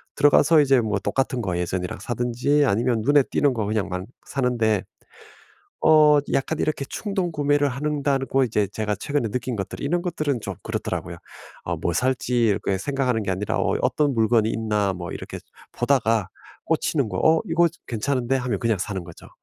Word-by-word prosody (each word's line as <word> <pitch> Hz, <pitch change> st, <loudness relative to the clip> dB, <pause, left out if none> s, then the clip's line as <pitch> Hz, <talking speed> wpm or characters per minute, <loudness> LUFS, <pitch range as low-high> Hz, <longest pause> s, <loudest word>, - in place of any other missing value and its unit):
들어가서 145 Hz, +2 st, +5 dB
이제 135 Hz, -3 st, +4 dB
뭐 105 Hz, -3 st, -1 dB
똑같은 130 Hz, +4 st, -1 dB
거 90 Hz, -4 st, -2 dB
예전이랑 90 Hz, +1 st, -3 dB
사든지 125 Hz, +5 st, 0 dB
아니면 115 Hz, +1 st, +1 dB
눈에 145 Hz, +5 st, +4 dB
띄는 140 Hz, 0 st, +1 dB
거 110 Hz, -3 st, -2 dB
그냥 105 Hz, -1 st, -1 dB
막 90 Hz, 0 st, -4 dB, 0.2 s
사는데 120 Hz, -6 st, 0 dB, 1.0 s
어 150 Hz, -1 st, +6 dB
약간 150 Hz, +3 st, 0 dB
이렇게 155 Hz, -2 st, -1 dB
충동구매를 150 Hz, -8 st, 0 dB
하는 145 Hz, +3 st, -2 dB
다고 135 Hz, -1 st, +1 dB
이제 105 Hz, -4 st, +1 dB
제가 105 Hz, +1 st, -2 dB
최근에 130 Hz, +2 st, -1 dB
느낀 125 Hz, +2 st, -3 dB
것들 95 Hz, -, -5 dB
이런 175 Hz, +5 st, 0 dB
것들은 155 Hz, -7 st, -2 dB
좀 100 Hz, -2 st, -5 dB
그렇더라고요. -, -, -4 dB, 0.5 s
어 -, -, -2 dB
뭐 85 Hz, -, -2 dB
살지 125 Hz, -1 st, +1 dB
이렇게 100 Hz, -2 st, 0 dB
생각하는 130 Hz, -1 st, -1 dB
게 100 Hz, -, -2 dB
아니라 95 Hz, +2 st, -2 dB
어떤 145 Hz, -3 st, +1 dB
물건이 110 Hz, -1 st, +2 dB
있나 105 Hz, -3 st, 0 dB
뭐 90 Hz, -1 st, -6 dB
이렇게 -, -, -7 dB, 0.3 s
보다가 115 Hz, -6 st, +1 dB, 0.4 s
꽂히는 140 Hz, -7 st, 0 dB
거 -, -, -4 dB
어 160 Hz, 0 st, +4 dB
'이거 170 Hz, +1 st, +3 dB, 0.2 s
괜찮은데.' 125 Hz, +2 st, -1 dB
하면 125 Hz, -5 st, -2 dB
그냥 115 Hz, -2 st, 0 dB
사는 95 Hz, -1 st, -4 dB
거죠. 85 Hz, -1 st, -13 dB
125 Hz, 365 characters per minute, -23 LUFS, 105-145 Hz, 1.0 s, 어